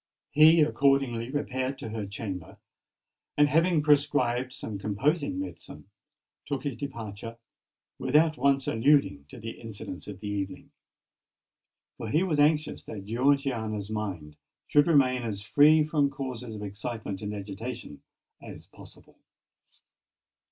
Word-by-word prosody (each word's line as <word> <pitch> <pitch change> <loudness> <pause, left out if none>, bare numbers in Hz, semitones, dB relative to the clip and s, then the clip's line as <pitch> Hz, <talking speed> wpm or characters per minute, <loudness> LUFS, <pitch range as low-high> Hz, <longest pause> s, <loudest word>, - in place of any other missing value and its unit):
He 155 +2 +7
accordingly 135 -5 +2
repaired 130 -1 -2
to - - -6
her 110 -2 -4
chamber, 95 -4 -6 0.8
and 145 0 +5
having 165 +1 +3
prescribed 140 -4 +2
some 110 -6 -6
composing 145 - 0
medicine, 285 - -8 0.6
took 140 -3 -3
his 140 -4 -3
departure, 115 -4 -7 0.6
without 155 +1 +3
once 135 0 +2
alluding 115 - +2
to - - -11
the 115 +1 -8
incidents 105 -5 -8
of 100 -3 -8
the 105 - -6
evening; 100 -2 -4 1.3
for 115 - -5
he 155 +10 +2
was 160 -6 0
anxious 150 +1 +2
that 100 -3 -8
Georgiana's 115 -4 0
mind 90 -9 -5 0.3
should 145 +1 +4
remain 130 -6 +4
as 105 -4 -4
free 150 +7 +5
from 150 -2 +1
causes 125 -4 -6
of 105 - -7
excitement 105 -1 -5
and 105 0 -4
agitation 105 - -7 0.4
as - - -10
possible. - - -16
125 Hz, 125 wpm, -28 LUFS, 105-145 Hz, 1.3 s, He